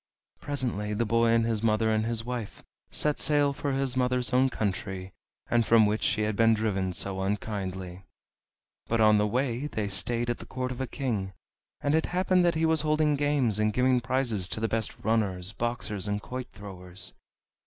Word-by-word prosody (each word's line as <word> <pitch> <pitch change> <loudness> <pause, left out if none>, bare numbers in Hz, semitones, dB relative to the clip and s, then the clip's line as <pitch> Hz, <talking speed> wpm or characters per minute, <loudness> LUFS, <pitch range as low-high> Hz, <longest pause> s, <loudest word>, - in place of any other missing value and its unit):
Presently 120 -7 -2
the 115 - 0
boy 115 +2 +2
and 115 0 +3
his 115 -2 0
mother 110 0 +2
and 110 0 +1
his 115 -1 -1
wife 120 -4 -5 0.3
set 150 -1 +1
sail 145 -2 +3
for 140 0 -3
his 135 -1 -1
mother's 125 -1 0
own 130 +1 +4
country, 95 -3 -3 0.5
from 115 -1 +5
which 105 +1 0
she 110 - +1
had 105 -1 -1
been 115 +1 +4
driven 100 -4 -1
so 95 +1 -1
unkindly. 95 -2 -4 0.9
But 115 - 0
on 110 -1 +5
the 105 - +2
way 125 +3 -1
they 110 -8 -3
stayed 120 +5 +1
at 120 - -5
the - - -10
court 130 0 -3
of 125 +1 -5
a 130 - -2
king, 110 -8 -3 0.5
and 145 - +1
it 160 0 +2
happened 185 0 +2
that 170 -1 +2
he 160 +1 +1
was 160 -1 +3
holding 155 0 +2
games, 140 -7 +1
and 105 0 +2
giving 125 +2 +2
prizes 115 -6 -1
to 110 - -3
the 115 - 0
best 110 -1 -2
runners, 100 -4 0
boxers, 110 -3 -2
and 105 0 -1
quoit 125 +4 -6
throwers. 95 -2 -3
115 Hz, 185 wpm, -28 LUFS, 105-130 Hz, 0.9 s, from